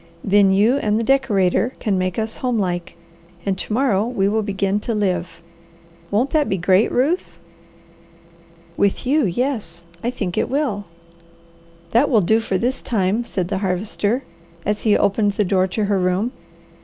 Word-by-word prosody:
Then 200 Hz, 0 st, +4 dB
you 210 Hz, +7 st, +3 dB
and 215 Hz, -6 st, 0 dB
the 230 Hz, -, 0 dB
decorator 235 Hz, -3 st, +2 dB
can 210 Hz, -4 st, -1 dB
make 185 Hz, -1 st, -1 dB
us 220 Hz, 0 st, -3 dB
home 250 Hz, -2 st, -1 dB
like, 175 Hz, -4 st, -2 dB, 0.5 s
and 195 Hz, -1 st, 0 dB
to -, -, -5 dB
morrow 220 Hz, -4 st, +2 dB
we 215 Hz, -6 st, 0 dB
will 220 Hz, +2 st, +1 dB
begin 200 Hz, -1 st, -1 dB
to 230 Hz, +2 st, -3 dB
live. 180 Hz, -4 st, -2 dB, 0.7 s
Won't 235 Hz, +7 st, +1 dB
that 305 Hz, -2 st, +2 dB
be 195 Hz, -, 0 dB
great, 185 Hz, +4 st, +3 dB
Ruth?" 295 Hz, +9 st, 0 dB, 1.4 s
"With 200 Hz, +4 st, +1 dB
you, 280 Hz, -1 st, +2 dB
yes, 200 Hz, -5 st, -3 dB, 0.2 s
I 240 Hz, -, 0 dB
think 200 Hz, -8 st, -3 dB
it -, -, -1 dB
will." 260 Hz, -8 st, -1 dB, 1.1 s
"That 250 Hz, +6 st, +3 dB
will 225 Hz, -6 st, +4 dB
do 220 Hz, +5 st, +3 dB
for 195 Hz, -4 st, -1 dB
this 250 Hz, +7 st, -1 dB
time," 210 Hz, +1 st, 0 dB
said 185 Hz, -6 st, -3 dB
the 195 Hz, -2 st, -1 dB
Harvester, 205 Hz, +5 st, -1 dB, 0.4 s
as 210 Hz, +1 st, -1 dB
he 215 Hz, -2 st, +3 dB
opened 205 Hz, +1 st, +1 dB
the 210 Hz, -, 0 dB
door 185 Hz, 0 st, +2 dB
to 210 Hz, +3 st, -1 dB
her 200 Hz, -1 st, +1 dB
room. 185 Hz, +6 st, 0 dB
205 Hz, 170 wpm, -20 LUFS, 190-240 Hz, 1.4 s, Then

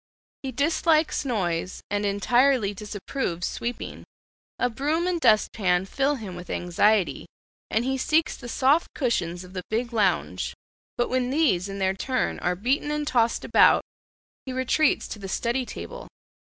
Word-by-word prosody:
He 270 Hz, -, -4 dB
dislikes 310 Hz, +3 st, +2 dB
noise, 185 Hz, -7 st, -2 dB
and 205 Hz, 0 st, 0 dB
entirely 240 Hz, +2 st, +3 dB
disapproves 205 Hz, -2 st, -4 dB
sweeping. 240 Hz, +1 st, -5 dB, 0.5 s
A 250 Hz, -, +2 dB
broom 295 Hz, +8 st, -1 dB
and 355 Hz, -2 st, -1 dB
dustpan 205 Hz, -, +3 dB
fill 275 Hz, +8 st, 0 dB
him 210 Hz, -8 st, -7 dB
with 180 Hz, 0 st, -9 dB
anxiety, 185 Hz, +3 st, +1 dB, 0.4 s
and 225 Hz, +2 st, +1 dB
he 265 Hz, 0 st, -1 dB
seeks 310 Hz, +3 st, +2 dB
the 240 Hz, -, -9 dB
soft 275 Hz, +7 st, +2 dB
cushions 180 Hz, -, -1 dB
of 180 Hz, 0 st, -13 dB
the 185 Hz, -, -3 dB
big 235 Hz, +2 st, -2 dB
lounge; 185 Hz, -, 0 dB, 0.4 s
but 240 Hz, -, +1 dB
when 255 Hz, -1 st, 0 dB
these 240 Hz, -, +2 dB
in 195 Hz, -, -5 dB
their 190 Hz, -1 st, +1 dB
turn 255 Hz, +6 st, -1 dB
are 180 Hz, -, 0 dB
beaten 255 Hz, +9 st, 0 dB
and 300 Hz, 0 st, -2 dB
tossed 235 Hz, -4 st, +1 dB
about, -, -, +5 dB, 0.6 s
he -, -, -3 dB
retreats 260 Hz, +4 st, +1 dB
to 210 Hz, -, -6 dB
the 195 Hz, -1 st, -7 dB
study 240 Hz, +5 st, -1 dB
table. -, -, -8 dB
235 Hz, 150 wpm, -25 LUFS, 195-275 Hz, 0.6 s, about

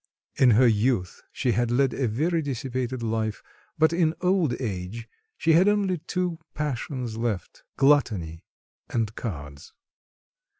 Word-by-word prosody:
In 130 Hz, -, +5 dB
her 130 Hz, -, +6 dB
youth 110 Hz, -4 st, +1 dB
she 125 Hz, -, 0 dB
had 120 Hz, 0 st, +1 dB
led 130 Hz, +2 st, +2 dB
a 130 Hz, -, 0 dB
very 160 Hz, +10 st, 0 dB
dissipated 130 Hz, -2 st, -3 dB
life, 110 Hz, -1 st, -2 dB, 0.3 s
but 160 Hz, +1 st, +4 dB
in 165 Hz, -2 st, +2 dB
old 180 Hz, -8 st, +1 dB
age 110 Hz, 0 st, -4 dB, 0.3 s
she 165 Hz, -, +3 dB
had 175 Hz, +5 st, +5 dB
only 200 Hz, -4 st, +2 dB
two 180 Hz, 0 st, -2 dB, 0.2 s
passions 130 Hz, -5 st, -3 dB
left 115 Hz, -7 st, -3 dB, 0.2 s
gluttony 105 Hz, -, +2 dB, 0.5 s
and 110 Hz, -2 st, -1 dB
cards. 70 Hz, -, -7 dB
125 Hz, 130 wpm, -26 LUFS, 110-155 Hz, 0.5 s, her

